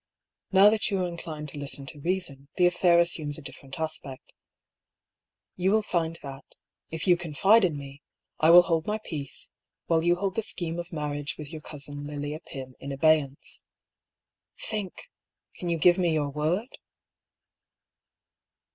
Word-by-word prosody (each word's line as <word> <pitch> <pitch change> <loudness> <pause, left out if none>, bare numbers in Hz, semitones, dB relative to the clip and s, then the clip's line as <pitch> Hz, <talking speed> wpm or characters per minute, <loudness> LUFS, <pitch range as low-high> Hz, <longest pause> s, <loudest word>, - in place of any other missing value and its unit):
Now 200 +2 +7
that 215 -1 +1
you 195 -3 0
are - - 0
inclined 160 -3 -6
to 145 - -7
listen 140 -1 -4
to 145 +2 -9
reason, 155 -5 -2
the 180 - +4
affair 175 0 +4
assumes 160 -4 +1
a - - -9
different 135 +3 -8
aspect. 155 -4 -5 1.2
You 185 +1 +1
will 215 +2 +3
find 165 -4 -1
that, 135 -1 -8 0.5
if 160 0 -4
you 180 -2 +6
confide 175 +7 +4
in 165 -5 +1
me, 140 0 -9 0.4
I 155 - +5
will 175 +1 +10
hold 165 -2 0
my 210 +1 0
peace, 150 -10 -7 0.3
while 165 -1 +2
you 175 +1 +3
hold 190 +1 -2
the 225 - 0
scheme 170 -5 -2
of 175 0 -6
marriage 145 -2 -3
with 150 -2 -8
your 155 - -7
cousin 145 -1 -6
Lilia 145 +1 -4
Pym 130 -5 -8
in 140 - -6
abeyance. 145 -1 +1 1.0
Think 210 -4 -4
I - - -19
Can 175 - -3
you 170 - +1
give 175 +3 +5
me 175 -2 +2
your 150 -2 0
word 165 - -2
160 Hz, 165 wpm, -27 LUFS, 145-180 Hz, 1.2 s, will